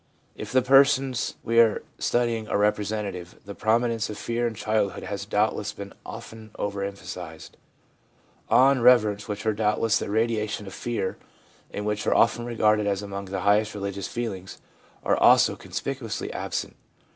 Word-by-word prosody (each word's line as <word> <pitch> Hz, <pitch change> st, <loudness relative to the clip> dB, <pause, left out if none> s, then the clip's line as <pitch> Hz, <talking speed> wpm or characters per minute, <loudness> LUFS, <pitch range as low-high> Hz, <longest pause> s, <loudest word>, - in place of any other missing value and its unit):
If -, -, -7 dB
the 130 Hz, 0 st, +3 dB
persons 135 Hz, -1 st, +3 dB
we 115 Hz, +1 st, +2 dB
are 115 Hz, -3 st, +4 dB, 0.2 s
studying 115 Hz, -2 st, 0 dB
are -, -, 0 dB
representative, 105 Hz, -3 st, -1 dB
the 100 Hz, -, -7 dB
prominence 115 Hz, +1 st, +1 dB
of 105 Hz, -, -6 dB
fear 120 Hz, +2 st, -1 dB
in 115 Hz, -, -5 dB
childhood 105 Hz, -3 st, -1 dB
has 100 Hz, 0 st, -5 dB
doubtless 105 Hz, -1 st, 0 dB
been 100 Hz, -1 st, -9 dB
often 110 Hz, -1 st, -10 dB
over 100 Hz, -1 st, -3 dB
emphasised. 90 Hz, -4 st, -7 dB, 0.9 s
2 -, -, +3 dB
Awe 130 Hz, +2 st, +7 dB
and 130 Hz, -4 st, 0 dB
reverence, 105 Hz, -4 st, +4 dB
which 105 Hz, 0 st, -5 dB
are 110 Hz, -, +2 dB
doubtless 105 Hz, +1 st, +1 dB
the -, -, -3 dB
irradiation 110 Hz, -1 st, -1 dB
of 95 Hz, -, -9 dB
fear, 115 Hz, -6 st, -3 dB, 0.5 s
and 105 Hz, -, -5 dB
which 105 Hz, 0 st, -2 dB
are -, -, +3 dB
often 120 Hz, 0 st, +3 dB
regarded 105 Hz, -3 st, +2 dB
as 100 Hz, 0 st, -1 dB
among 100 Hz, 0 st, -6 dB
the 95 Hz, 0 st, -4 dB
highest 105 Hz, +2 st, +2 dB
religious 100 Hz, -1 st, -4 dB
feelings, 95 Hz, -6 st, -5 dB, 0.5 s
are -, -, +2 dB
also -, -, +5 dB
conspicuously 135 Hz, -5 st, -5 dB
absent. -, -, -4 dB
105 Hz, 160 wpm, -25 LUFS, 100-115 Hz, 0.9 s, Awe